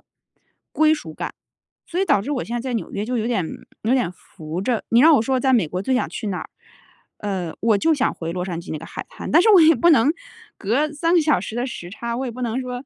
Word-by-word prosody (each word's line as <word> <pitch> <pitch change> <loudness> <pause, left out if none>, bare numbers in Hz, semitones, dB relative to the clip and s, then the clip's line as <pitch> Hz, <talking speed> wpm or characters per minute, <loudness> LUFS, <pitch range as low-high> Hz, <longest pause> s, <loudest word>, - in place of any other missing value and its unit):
属 - - -36
感。 - - -61 1.8
所 350 - -3
以 390 - +2
导 200 - +3
致 280 - -4
我 265 -4 -1
现 235 - -7
在 240 - -2
在 - - -2
纽 205 -7 -4
约 205 - -2
就 250 0 -2
有 225 - -1
点 215 -8 0 0.4
有 230 - +2
点 250 -9 +1
浮 165 -1 -8
着， 230 +2 -1
你 230 - +4
让 320 +2 +7
我 240 - +3
说 260 +3 0
在 265 0 +2
美 205 -10 +3
国 180 +4 -3
最 260 - -1
想 255 - +1
去 215 - -5
哪 190 - -2
儿， - - -9 0.7
呃， 190 -5 -3
我 220 -2 +3
就 325 +10 +2
想 275 -3 0
回 165 0 -5
洛 180 +1 -3
杉 170 -3 -4
矶 175 - -9
那 155 - -4
个 165 - -9
海 - - -7
滩， - - -8
但 340 - +6
是 440 - +4
我 390 -4 +8
也 320 0 +6
不 345 - +3
能 285 -2 +5 0.5
隔 260 +10 0
3 330 +4 0
个 345 - +5
小 300 - +2
时 220 - -6
的 245 +2 -1
时 175 -7 -7
差， 235 +4 -5
我 260 +2 -3
也 245 - -4
不 250 +2 -8
能 240 +2 -1
说 250 +1 -6
235 Hz, 285 characters per minute, -22 LUFS, 195-270 Hz, 1.8 s, 我